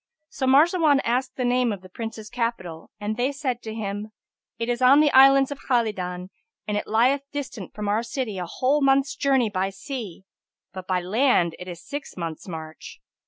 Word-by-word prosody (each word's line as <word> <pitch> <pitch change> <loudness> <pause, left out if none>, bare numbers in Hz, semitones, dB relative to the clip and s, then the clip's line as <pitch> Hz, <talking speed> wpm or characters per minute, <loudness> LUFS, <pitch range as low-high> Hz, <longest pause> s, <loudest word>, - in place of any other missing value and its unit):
So 280 -4 -3
Marzawan 300 +1 +5
asked 250 +3 -1
the 250 - -2
name 245 -1 +2
of 200 -3 -5
the - - -11
Prince's 220 +2 -7
capital 210 -9 -4
and 210 +1 -3
they 250 +3 +1
said 265 -4 -3
to 220 - -6
him, 205 -1 -4 0.5
"It 230 - -3
is 245 0 -1
on 260 +3 +7
the 300 -1 +4
Islands 270 +1 +6
of 285 - -5
Khalidan 190 -7 -2 0.4
and 210 - -1
it 205 - -2
lieth 250 +6 +3
distant 260 - -6
from 210 -1 -4
our 210 +2 +1
city 230 -4 -4
a 175 - -4
whole 275 - +1
month's 275 0 +3
journey 265 -6 +2
by 190 0 -1
sea, 200 - -7 0.5
but 185 -1 -8
by 185 -1 0
land 185 - +2
it 180 - -8
is 175 -2 -9
six 285 -6 -7
months' 165 -1 -5
march." 160 -2 -8
230 Hz, 190 wpm, -24 LUFS, 195-270 Hz, 0.5 s, on